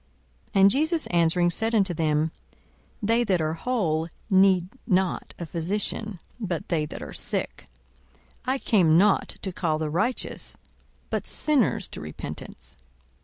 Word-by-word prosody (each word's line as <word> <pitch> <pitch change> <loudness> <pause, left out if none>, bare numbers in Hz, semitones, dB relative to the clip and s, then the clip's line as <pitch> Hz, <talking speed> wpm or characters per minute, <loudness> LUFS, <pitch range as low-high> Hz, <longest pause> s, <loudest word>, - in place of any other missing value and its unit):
42:005:031 195 - +5
And 195 +1 +7
Jesus 315 - +1
answering 175 0 +3
said 225 +6 0
unto 195 -4 +2
them, 155 -1 +1 0.7
They 230 +3 +3
that 190 -6 +1
are 155 0 0
whole 165 -5 -1 0.2
need 190 -2 +4 0.2
not 185 -1 0
a 170 - -5
physician; 190 +4 -2 0.2
but 180 -7 -3
they 155 -3 0
that - - -7
are - - -8
sick. - - -1 0.8
42:005:032 260 - +3
I - - -1
came 180 -11 +4
not 200 +2 +3
to 190 - -2
call 160 -3 0
the 155 -1 -2
righteous, 215 +10 -2 0.5
but - - -2
sinners 240 - +2
to - - -8
repentance. 75 0 -8
185 Hz, 145 wpm, -26 LUFS, 165-215 Hz, 0.8 s, And